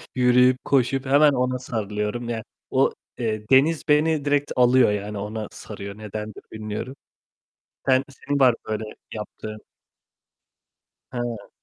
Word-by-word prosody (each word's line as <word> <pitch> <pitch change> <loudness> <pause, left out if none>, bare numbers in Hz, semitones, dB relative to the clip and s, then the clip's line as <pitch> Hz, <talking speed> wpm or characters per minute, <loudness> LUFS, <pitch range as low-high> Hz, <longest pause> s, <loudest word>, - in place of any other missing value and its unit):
yürüyüp 125 0 +5
koşup 135 0 +2
hemen 145 +2 +6
ona 125 0 0
sarılıyorum. 110 0 -3
Ya 115 -2 -3 0.3
o, - - +3 0.2
eee, 110 -2 -3
deniz 145 +4 +4
beni 150 0 +3
direkt 145 0 +1
alıyor 125 -2 +5
yani 105 0 -3
ona 105 +1 -4
sarıyor, 100 -1 -8
nedendir 105 0 -7
bilmiyorum. 110 +4 -5 0.9
Sen 130 0 +4
senin 145 +1 -3
var 125 -3 +6
böyle 110 0 -2 0.3
yaptığın? 110 0 -7 1.5
Ha. 120 -4 -4
120 Hz, 120 wpm, -24 LUFS, 105-130 Hz, 1.5 s, hemen